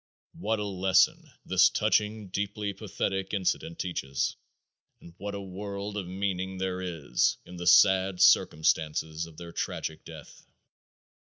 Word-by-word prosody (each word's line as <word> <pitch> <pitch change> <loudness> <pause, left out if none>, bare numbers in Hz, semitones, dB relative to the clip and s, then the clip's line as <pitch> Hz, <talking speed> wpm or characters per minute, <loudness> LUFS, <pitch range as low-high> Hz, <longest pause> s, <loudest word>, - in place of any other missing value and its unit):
What 110 +2 -1
a 105 - -3
lesson 100 - +2 0.2
this 95 -1 +5
touching, 105 -1 0
deeply 100 +1 -3
pathetic 95 0 -3
incident 90 -3 -1
teaches 70 -7 -2 0.6
and 85 - -14
what 100 +1 -5
a - - -4
world 100 +1 -6
of 100 -4 -4
meaning 95 0 -3
there 95 0 -2
is 85 -5 0
in 90 - -11
the 90 0 -4
sad 95 0 +5
circumstances 80 +1 +3
of 80 -2 -16
their 85 -1 -9
tragic 80 -1 -4
death! 80 -3 -13
95 Hz, 135 wpm, -28 LUFS, 85-100 Hz, 0.6 s, this